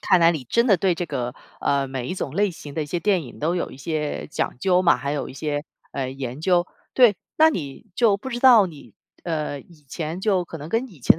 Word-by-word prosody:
看 185 Hz, -3 st, +4 dB
来 165 Hz, 0 st, +7 dB
你 150 Hz, -6 st, -3 dB
真 235 Hz, -, +2 dB
的 195 Hz, -, +6 dB
对 180 Hz, 0 st, +2 dB
这 175 Hz, -, -3 dB
个， 120 Hz, -2 st, -3 dB, 0.3 s
呃， 140 Hz, -1 st, +1 dB
每 130 Hz, -2 st, -4 dB
一 180 Hz, -, -3 dB
种 140 Hz, -, -4 dB
类 205 Hz, -1 st, +3 dB
型 145 Hz, -3 st, -10 dB
的 155 Hz, -, -2 dB
一 -, -, -5 dB
些 170 Hz, +4 st, -2 dB
电 190 Hz, -6 st, +2 dB
影 120 Hz, -, -11 dB
都 170 Hz, +4 st, +1 dB
有 -, -, -2 dB
一 -, -, -11 dB
些 150 Hz, +1 st, -3 dB
讲 145 Hz, -, -2 dB
究 185 Hz, -1 st, +3 dB
嘛， 175 Hz, -2 st, +5 dB
还 140 Hz, 0 st, -4 dB
有 145 Hz, -, -2 dB
一 -, -, -9 dB
些， 145 Hz, +1 st, -2 dB, 0.3 s
呃， 135 Hz, -2 st, -3 dB
研 135 Hz, +1 st, -6 dB
究。 175 Hz, 0 st, +3 dB, 0.3 s
对， 240 Hz, -7 st, +6 dB, 0.2 s
那 315 Hz, +1 st, +6 dB
你 145 Hz, -, -5 dB
就 220 Hz, -5 st, +4 dB
不 235 Hz, +6 st, -7 dB
知 240 Hz, -, -3 dB
道 240 Hz, -6 st, +7 dB
你， 155 Hz, -5 st, -12 dB, 0.3 s
呃， 150 Hz, -4 st, -2 dB
以 155 Hz, -2 st, -20 dB
前 165 Hz, +4 st, -4 dB
就 190 Hz, -4 st, +2 dB
可 165 Hz, -, -8 dB
能 150 Hz, +1 st, -8 dB
跟 230 Hz, +6 st, 0 dB
以 175 Hz, -9 st, -17 dB
前 140 Hz, -, +5 dB
165 Hz, 270 characters per minute, -23 LUFS, 145-190 Hz, 0.3 s, 来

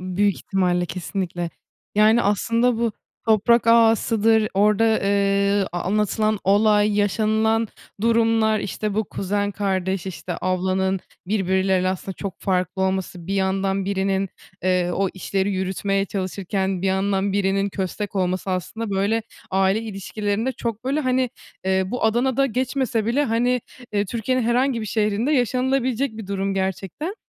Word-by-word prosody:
büyük 185 Hz, +2 st, +1 dB
ihtimalle, 180 Hz, -2 st, 0 dB
kesinlikle. 175 Hz, -1 st, -4 dB, 0.4 s
Yani 215 Hz, +3 st, +5 dB
aslında 230 Hz, +4 st, +2 dB
bu 230 Hz, -1 st, 0 dB, 0.3 s
toprak 225 Hz, +2 st, +4 dB
ağasıdır, 225 Hz, -1 st, +4 dB
orda, 210 Hz, +2 st, +3 dB
eee, 200 Hz, 0 st, +2 dB
ııı, 195 Hz, -, +1 dB
anlatılan 210 Hz, +4 st, 0 dB
olay 210 Hz, +1 st, +4 dB
yaşanılan 220 Hz, +2 st, +1 dB, 0.3 s
durumlar, 225 Hz, -1 st, +3 dB
işte 210 Hz, +1 st, -3 dB
bu 220 Hz, +1 st, +1 dB
kuzen, 205 Hz, +1 st, -2 dB
kardeş, 190 Hz, -2 st, -1 dB
işte, 185 Hz, -1 st, -5 dB
ablanın 185 Hz, +1 st, 0 dB, 0.3 s
birbirleriyle 190 Hz, -1 st, +1 dB
aslında 190 Hz, +1 st, -3 dB
çok 195 Hz, -2 st, -6 dB
farklı 185 Hz, -1 st, 0 dB
olması, 190 Hz, -2 st, -2 dB
bir 195 Hz, -, -2 dB
yandan 195 Hz, 0 st, 0 dB
birinin, 195 Hz, 0 st, 0 dB, 0.3 s
eee, 180 Hz, -1 st, +1 dB
o 195 Hz, 0 st, +1 dB
işleri 195 Hz, +1 st, -1 dB
yürütmeye 195 Hz, +1 st, -1 dB
çalışırken 190 Hz, -1 st, -2 dB
bir -, -, +1 dB
yandan 195 Hz, +1 st, +1 dB
birinin 195 Hz, 0 st, +1 dB
köstek 200 Hz, +1 st, -4 dB
olması 185 Hz, 0 st, -1 dB
aslında 200 Hz, +5 st, -3 dB
böyle 200 Hz, +4 st, +1 dB, 0.3 s
aile 195 Hz, +3 st, +2 dB
ilişkilerinde 210 Hz, +2 st, -2 dB
çok 230 Hz, -2 st, -4 dB
böyle 275 Hz, +4 st, 0 dB
hani, 255 Hz, -2 st, +1 dB, 0.3 s
eee, 190 Hz, 0 st, +2 dB
bu, 245 Hz, +5 st, -3 dB
Adana'da 250 Hz, +4 st, +2 dB
geçmese 255 Hz, -2 st, -1 dB
bile 265 Hz, +6 st, +2 dB
hani, 245 Hz, +1 st, +1 dB, 0.3 s
eee, 205 Hz, -1 st, +1 dB
Türkiye'nin 240 Hz, +5 st, -1 dB
herhangi 240 Hz, +1 st, +1 dB
bir 215 Hz, -, -4 dB
şehrinde 215 Hz, +5 st, 0 dB
yaşanılabilecek 255 Hz, -1 st, +1 dB
bir 220 Hz, -, -7 dB
durum 195 Hz, 0 st, -2 dB
gerçekten. 195 Hz, -, -3 dB
200 Hz, 135 wpm, -22 LUFS, 190-225 Hz, 0.4 s, Yani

